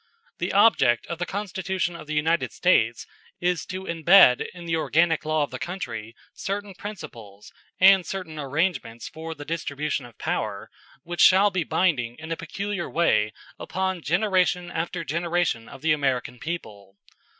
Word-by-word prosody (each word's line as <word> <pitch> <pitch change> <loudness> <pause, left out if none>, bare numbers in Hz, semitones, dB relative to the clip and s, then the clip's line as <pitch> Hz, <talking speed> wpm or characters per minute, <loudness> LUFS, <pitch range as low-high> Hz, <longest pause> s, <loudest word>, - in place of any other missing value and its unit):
The 175 - -1
object 195 - +4
of 170 - -6
the 175 - -2
Constitution 190 -2 -2
of 160 - -10
the 155 - -3
United 160 +3 +1
States - - +2 0.3
is 175 -3 -1
to 185 0 -5
imbed 170 -5 +6
in 175 -1 -11
the 165 -1 0
organic 160 0 +2
law 155 -1 +1
of 145 - -5
the - - -6
country 120 - -5 0.2
certain 200 0 -4
principles, 120 - -10 0.3
and 190 0 +7
certain 175 -5 -6
arrangements 140 -5 -2
for 160 +1 -7
the 145 -1 -9
distribution 150 -4 -3
of 115 -2 -19
power, 105 0 -3 0.3
which 175 +2 -3
shall 195 +2 +6
be 180 -2 0
binding 130 -11 0
in 160 +1 -8
a - - 0
peculiar 195 +3 -4
way 110 -11 +2 0.3
upon 190 -1 -2
generation 180 +1 +1
after 165 +1 -3
generation 170 -6 -1
of 135 - -12
the 160 - +3
American 130 -4 -1
people. 100 - -7
165 Hz, 155 wpm, -25 LUFS, 140-185 Hz, 0.3 s, and